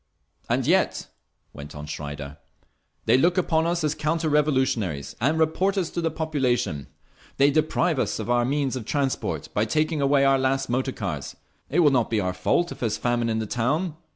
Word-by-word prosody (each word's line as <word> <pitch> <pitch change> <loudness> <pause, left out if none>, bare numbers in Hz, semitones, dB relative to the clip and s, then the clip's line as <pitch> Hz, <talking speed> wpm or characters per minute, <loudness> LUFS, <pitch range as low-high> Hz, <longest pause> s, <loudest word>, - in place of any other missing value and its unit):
"And - - +1
yet," - - +1 0.4
went 70 +1 -10
on 75 0 -7
Schreider, 75 -1 -7 0.7
"they 130 - +4
look 170 +4 +3
upon 165 -2 +2
us 170 -1 -1
as 150 -1 +1
counter 155 +1 -1
revolutionaries 130 - 0
and 150 +6 +2
report 180 +5 +1
us 180 -4 -1
to 170 - -2
the 165 - +1
population. 130 - -1 0.5
They 140 +1 +5
deprive 155 0 +1
us - - -1
of - - -5
our 120 0 +2
means 135 +1 0
of 125 -4 -5
transport 140 0 -2
by 105 - +1
taking 155 +5 0
away 140 0 +3
our 135 0 +4
last 135 -1 0
motor 130 +2 0
cars. 75 - -5 0.3
It 160 +6 +2
will 150 -3 +5
not 125 -4 +2
be 110 - +1
our 90 -2 -1
fault 170 - 0
if - - -8
there 120 - 0
is 105 - -2
famine 120 -1 0
in 110 - 0
the 110 - -2
town. 145 - -1
135 Hz, 195 wpm, -25 LUFS, 110-155 Hz, 0.7 s, They